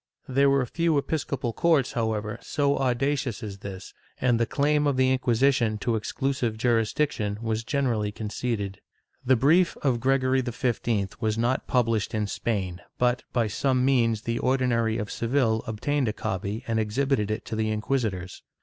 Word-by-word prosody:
^ - - -6
There 140 +1 +5
were 135 -2 +3
few 165 +4 +1
episcopal 140 -5 -2
courts, 155 -4 +2
however, 110 -2 -2
so 140 -1 +1
audacious 130 -1 0
as 100 -2 -6
this, 95 -1 -8 0.3
and 120 -2 +2
the 115 - +1
claim 150 +1 +2
of 140 -2 +1
the 130 0 +3
Inquisition 125 -3 +2
to 115 +2 -1
exclusive 120 0 -2
jurisdiction 115 -1 0
was 110 -1 -2
generally 115 -6 0
conceded. 105 -2 -3 0.4
The 130 +1 +4
brief 160 +9 +3
of 130 -4 +2
Gregory 130 +1 +2
XV 120 -5 -1
was 110 -1 0
not 120 +3 0
published 115 -4 +1
in 105 -1 0
Spain 100 -4 -3 0.2
but, 125 0 +2
by 120 -2 +1
some 130 +4 +1
means, 115 -5 +2
the 115 0 -1
Ordinary 120 -4 +1
of 105 -1 -4
Seville 115 -2 +1
obtained 130 +5 -1
a 105 - 0
copy 100 +5 -3
and 115 -1 0
exhibited 110 0 0
it 110 +1 -3
to 110 - -4
the 110 0 0
inquisitors. 105 -5 -2
120 Hz, 160 wpm, -26 LUFS, 110-135 Hz, 0.4 s, There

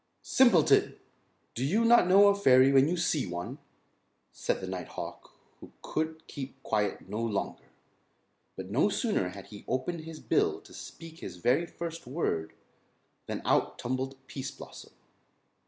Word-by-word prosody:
"Simpleton! 230 - +4 0.6
Do 120 - -3
you 205 +12 +2
not 235 -5 +6
know 200 +2 +7
a 200 - +3
fairy 130 -8 +6
when 135 0 +5
you 175 +2 0
see 160 - 0
one?" 85 0 -5 0.7
said - - -2
the 95 - -5
night 95 -2 -5
hawk - - -8 0.3
who - - -13
could 160 0 -3
keep 135 -1 -8
quiet 105 -3 -1
no 105 +3 -4
longer. 110 -4 -3 0.9
But 95 0 -7
no 135 - +3
sooner 205 - 0
had 100 +1 -11
he 105 -1 -11
opened 130 +7 -2
his 160 0 -9
bill - - +1
to - - -16
speak 165 0 -10
his - - -8
very 130 - +2
first 165 -2 -7
word 85 - -2 0.7
than - - -4
out - - +2
tumbled 130 +2 -3
Pease 135 -1 -5
Blossom. - - -12
135 Hz, 155 wpm, -29 LUFS, 110-170 Hz, 0.9 s, know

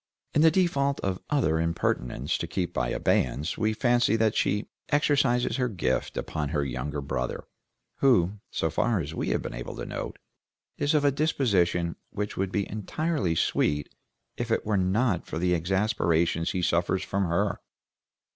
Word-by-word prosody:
In 150 - +3
the 160 - +8
default 145 -6 +1
of 95 -1 -1
other 115 - +2
impertinents 75 -5 -1
to 85 - -3
keep 90 +1 -3
in - - 0
abeyance 75 +6 0
we 110 0 +1
fancy 120 0 +3
that 110 -1 +2
she 105 +2 +1 0.2
exercises 140 -5 +2
her 125 -2 +1
gift 75 - -1
upon 75 -2 -2
her 75 -2 0
younger 70 +3 -3
brother, 60 -2 -3 0.5
who, 105 -7 +3
so 80 - -1
far 110 +6 +1
as 75 -1 -4
we - - -2
have - - 0
been - - -5
able - - -6
to - - -5
note, - - -5 0.6
is 145 +2 +1
of 145 -1 +3
a 140 - +5
disposition 100 - +1
which 105 0 -4
would 95 0 -1
be 100 -1 -1
entirely 110 - -1
sweet 75 -2 0 0.4
if 120 -1 -3
it 115 - 0
were 105 -1 +1
not 95 +1 +1
for - - -4
the 90 +2 +2
exasperations 85 -2 +1
he 90 - -2
suffers 85 +3 +1
from 100 0 -1
her. 85 0 0
95 Hz, 165 wpm, -27 LUFS, 80-120 Hz, 0.6 s, the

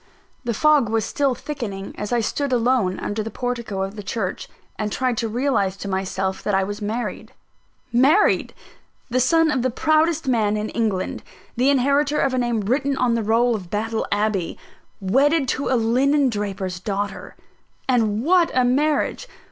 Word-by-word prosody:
The 235 -3 -2
fog 295 -3 +4
was 220 -1 0
still 275 +1 0
thickening, 230 -9 -6
as 210 - -5
I 240 -1 +2
stood 280 +5 -2
alone 235 -6 +1
under 210 +1 -3
the 220 - -4
portico 235 -6 -3
of 195 +2 -5
the 210 - -6
church, 195 -2 -4 0.3
and 210 -1 -3
tried 255 +1 0
to 230 - 0
realise 225 -5 0
to 200 - -6
myself 190 0 -2
that 205 - 0
I 195 - +2
was 205 +2 -5
married. 220 +4 -4 0.6
Married! 285 - +3 0.6
The 255 - +2
son 325 +5 +3
of 265 -4 0
the 255 - +1
proudest 315 +3 +1
man 215 -4 +2
in 210 +1 -3
England, 215 -5 -2 0.3
the 255 +3 +3
inheritor 280 +2 +2
of 270 - +1
a 255 - +1
name 240 -3 0
written 270 +6 0
on 245 -2 +2
the 230 - +1
roll 230 +3 +2
of 190 -6 -5
Battle 220 +3 -2
Abbey, 205 -4 0 0.4
wedded 275 - +2
to 275 - -1
a 255 - +3
linen 260 +4 +2
draper's 195 -3 -3
daughter! 200 0 -4 0.5
And 225 -4 +1
what 345 +2 +4
a 255 -1 +4
marriage! 295 - +1
235 Hz, 170 wpm, -22 LUFS, 205-270 Hz, 0.6 s, fog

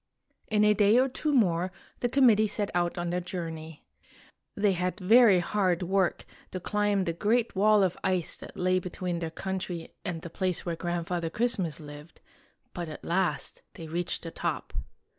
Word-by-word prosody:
In 210 -1 +2
a 210 0 +6
day 210 +2 +4
or 260 +1 +4
two 295 +3 -2
more 185 -8 +2 0.3
the 245 - 0
committee 230 -5 +5
set 205 -1 -2
out 175 0 0
on 175 0 -2
their 180 +1 -1
journey. 160 -3 -6 0.7
They 205 -1 +3
had 180 +2 -2
very 215 +1 +6
hard 185 -2 +1
work 190 0 +1 0.2
to 185 - -5
climb 205 +1 +1
the 170 - -1
great 225 +6 +1
wall 210 +1 +5
of 180 -2 +1
ice 185 -3 0
that - - -11
lay 185 0 +2
between 180 -1 -4
their 165 -1 -3
country 180 -1 -5
and 165 -3 -4
the 170 - -7
place 185 -2 -1
where 170 -1 -2
Grand 175 0 -2
father 170 -2 -2
Christmas 210 -6 -1
lived, 150 +1 -11 0.5
but 175 -2 -5
at 155 - -9
last 180 +2 0
they 165 - -8
reached 175 +2 -3
the 165 - -6
top. - - -3
185 Hz, 180 wpm, -28 LUFS, 170-210 Hz, 0.7 s, a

